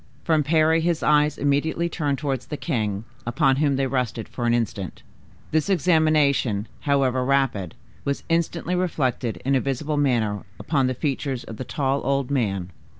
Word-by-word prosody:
From 160 -2 +3
Parry 160 +2 +3
his 170 -1 0
eyes 150 0 +3
immediately 145 +4 +1
turned 145 -4 -1
towards 135 -4 -3
the 150 - -4
king, 110 - -2 0.2
upon 130 +2 +2
whom 145 -1 +2
they 135 0 +1
rested 125 -4 -2
for 120 -2 -3
an 120 - +3
instant. 100 -6 -3 0.5
This 155 +3 +1
examination, 155 - +2
however 135 -3 +1
rapid, 130 -10 0 0.3
was 140 0 -2
instantly 170 +1 0
reflected 135 -10 -1
in 135 - +2
a 130 - +3
visible 145 +3 -2
manner 115 -8 +1 0.2
upon 135 -5 +1
the 130 - -1
features 135 -1 -2
of 110 - -9
the - - -4
tall 140 -1 0
old 140 0 0
man. 100 -9 -1
140 Hz, 160 wpm, -24 LUFS, 125-155 Hz, 0.5 s, From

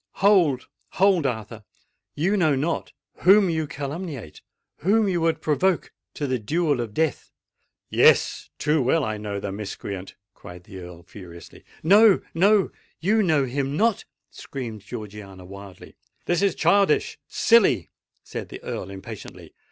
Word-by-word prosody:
"Hold! 180 -10 +3 0.3
hold! 185 -6 +3
Arthur—you 115 - -5
know 160 -7 +3
not 155 +5 -2 0.3
whom 195 0 +5
you 160 -2 -1
calumniate—whom 160 - -3
you 175 -3 0
would 165 -1 0
provoke 160 +4 +1 0.2
to 145 - -3
the 130 -2 -1
duel 150 +4 0
of 110 -3 -6
death!" 160 -3 -1 0.6
"Yes—too 150 0 +2
well 135 +5 +2
I 110 -3 -2
know 105 -1 -4
the 100 - -4
miscreant!" 100 -1 -6 0.2
cried 90 -1 -12
the 95 +1 -11
Earl 90 -1 -11
furiously. 85 -4 -13 0.2
"No—no—you 200 +1 +3
know 155 -8 +2
him 135 +2 -2
not!" 225 0 +1 0.3
screamed 115 -6 -7
Georgiana 100 -4 -9
wildly. 100 0 -12 0.3
"This 175 0 +1
is 200 -1 +2
childish—silly!" 200 - +2 0.3
said - - -7
the - - -10
Earl 95 - -5
impatiently. 95 -1 -10
145 Hz, 120 wpm, -24 LUFS, -, 0.6 s, whom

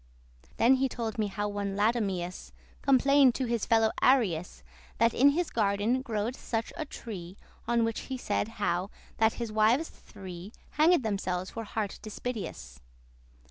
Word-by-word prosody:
*always 255 +3 +5
Then 270 0 +2
told 230 -2 -4
he - - +1
me 210 - 0
how 205 +1 -3
one 200 -1 -3
Latumeus 200 -5 -1 0.3
Complained 275 -1 +5
to 260 - -1
his 235 -3 -1
fellow 225 -1 +4
Arius 180 - +2 0.3
That 230 0 +3
in 275 +3 +6
his 330 +4 0
garden 215 +3 +1
growed 230 -1 -2
such 225 -3 -3
a 315 - -4
tree, 195 - -8 0.3
On 235 0 +2
which 225 -1 -1
he 260 - -3
said 210 -4 -1
how 185 -2 0 0.3
that 220 0 +3
his 235 -3 -5
wives 220 +9 +3
three 190 0 -10 0.2
Hanged 315 -1 +4
themselves 185 -4 -2
for 225 -1 -6
heart 210 -1 -4
dispiteous. 210 - -6
220 Hz, 155 wpm, -29 LUFS, 200-250 Hz, 0.3 s, in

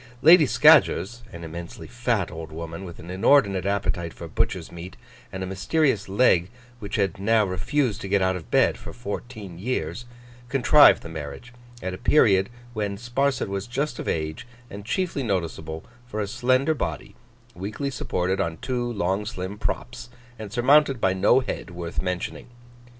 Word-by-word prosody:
Lady 160 -1 +8
Scadgers 120 0 +4
(an 85 -1 -9
immensely 85 +1 -8
fat 120 -5 -1
old 80 -1 -8
woman, 85 +3 -7
with 85 -2 -9
an 85 +3 -9
inordinate 100 -2 +3
appetite 90 -4 -1
for 85 - -8
butcher's 75 - -2
meat, 85 +1 -9 0.3
and 95 0 -5
a - - -2
mysterious 110 - 0
leg 95 -4 +3 0.3
which 100 0 -5
had 100 -5 0
now 110 +2 +3
refused 105 +6 -1
to - - -5
get 100 +1 +2
out 95 0 +1
of 85 -4 -8
bed - - +3
for - - -9
fourteen 105 -5 -7
years) 120 +2 -3 0.4
contrived 140 +3 +6
the - - -7
marriage, 80 +10 -8 0.3
at 95 0 -3
a 90 - -7
period 100 -7 +4 0.2
when 105 -3 -2
Sparsit 125 +3 0
was 100 +1 -4
just 130 +1 -2
of - - -5
age, 80 +6 -3 0.2
and 100 +1 -8
chiefly 170 - -1
noticeable 80 -7 -3 0.2
for 110 -3 -5
a 105 - 0
slender 130 +7 +2
body, 150 - -4 0.4
weakly 105 +10 -4
supported 95 -5 -1
on 80 -1 -2
two 120 +2 -2
long 100 -1 0
slim 100 -1 -6
props, 120 +1 -4 0.3
and 105 -2 -7
surmounted 135 +2 +4
by 95 -4 +2
no 105 +7 +4
head 125 - -5
worth 85 -1 -5
mentioning. 90 +5 -4
100 Hz, 165 wpm, -24 LUFS, 90-120 Hz, 0.4 s, Lady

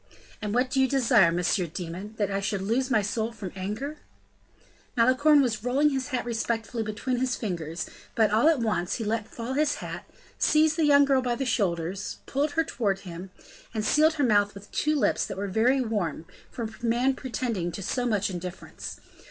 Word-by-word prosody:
"And 210 +1 -2
what 255 +1 +2
do 270 - +2
you 265 - +4
desire, 235 -9 +4
Monsieur 180 +1 +1
Demon? 180 +5 -7
That 205 -2 0
I 195 - 0
should 200 -1 -2
lose 245 +6 0
my 220 -5 +3
soul 220 +2 -1
from 205 -6 -7
anger?" 215 +11 -4 1.0
Malicorne 275 +5 +5
was 225 -4 -1
rolling 275 +5 +3
his 265 -2 -2
hat 255 -4 -2
respectfully 230 0 -2
between 220 +4 -2
his 255 0 0
fingers; 170 -6 -4 0.3
but, 220 -3 +3
all 225 +9 +5
at 325 - +3
once, 195 -5 0
he 230 - -3
let 220 0 -1
fall 235 +3 -5
his 290 +1 +2
hat, - - -7 0.3
seized 310 0 +4
the 320 -2 +2
young 285 -1 +6
girl 270 -2 +3
by 245 -1 0
the 270 - -2
shoulders, 185 -5 -1
pulled 290 +2 -1
her 325 - +2
towards 205 -11 -1
him, 180 0 -8 0.5
and 215 -1 -1
sealed 310 +7 +4
her 290 - 0
mouth 205 -4 +3
with 200 +1 -12
two 305 0 +1
lips 285 - +2
that 195 - -6
were 200 +1 -2
very 235 +7 +3
warm, 200 - -2 0.2
for 235 - -5
a 220 - -3
man 240 +3 +2
pretending 235 -9 -3
to 195 - -6
so 245 +6 -1
much 205 -4 0
indifference. 180 0 -7
225 Hz, 195 wpm, -27 LUFS, 200-260 Hz, 1.0 s, young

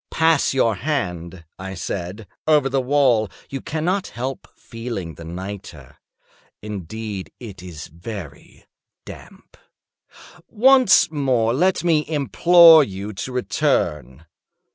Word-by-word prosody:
"Pass 160 -2 +2
your 115 -6 +1
hand," 90 - -4
I 95 0 -6
said, 95 +4 -5 0.2
"over 150 -3 +3
the 135 0 0
wall; 125 -5 +2 0.2
you 135 - -5
cannot 175 +5 -2
help 130 +3 -6
feeling 115 -8 -7
the 85 - -12
nitre. 85 -5 -9 0.6
Indeed 105 0 -7
it 100 -6 -10
is 85 -5 -9
very 85 -1 -10 0.4
damp. - - -14 0.9
Once 255 - +5
more 130 -6 +1
let 180 +8 +1
me 160 -3 +2
implore 165 +2 +6
you 100 -2 -6
to 100 +6 -6
return. 80 - -1
115 Hz, 110 wpm, -21 LUFS, 90-145 Hz, 0.9 s, implore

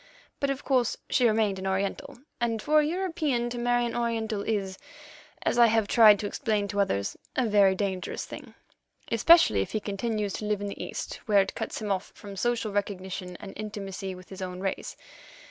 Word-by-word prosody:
But, 280 - 0
of 275 0 -3
course, 255 -4 +1
she 245 - +4
remained 215 -3 +1
an 190 - -4
Oriental, 190 +3 -2 0.2
and 230 -2 0
for 305 +7 +3
a - - +4
European 305 -8 -1
to 240 - -4
marry 245 0 +2
an 235 - -3
Oriental 225 -3 -1
is, 195 -3 -2 0.6
as 240 - +1
I 235 - +8
have 220 -2 +2
tried 215 -2 +7
to 205 - -4
explain 210 -2 -1
to 205 +1 -2
others, 100 - 0 0.2
a 260 - +2
very 200 -3 +4
dangerous 190 -2 -3
thing, - - -10 0.6
especially 230 - +6
if - - -4
he 215 - +1
continues 210 0 -2
to 215 - -4
live 210 -1 0
in 205 - -4
the - - -6
East, - - -5
where 205 -2 +5
it 195 - -7
cuts - - -4
him 205 - -2
off 190 -1 -2
from 200 -1 -10
social 230 +1 0
recognition 190 -2 -3
and 195 - -9
intimacy 195 -3 -5
with 185 0 -14
his 190 0 -9
own 180 -1 -5
race. 195 0 -4
210 Hz, 195 wpm, -27 LUFS, 195-235 Hz, 0.6 s, I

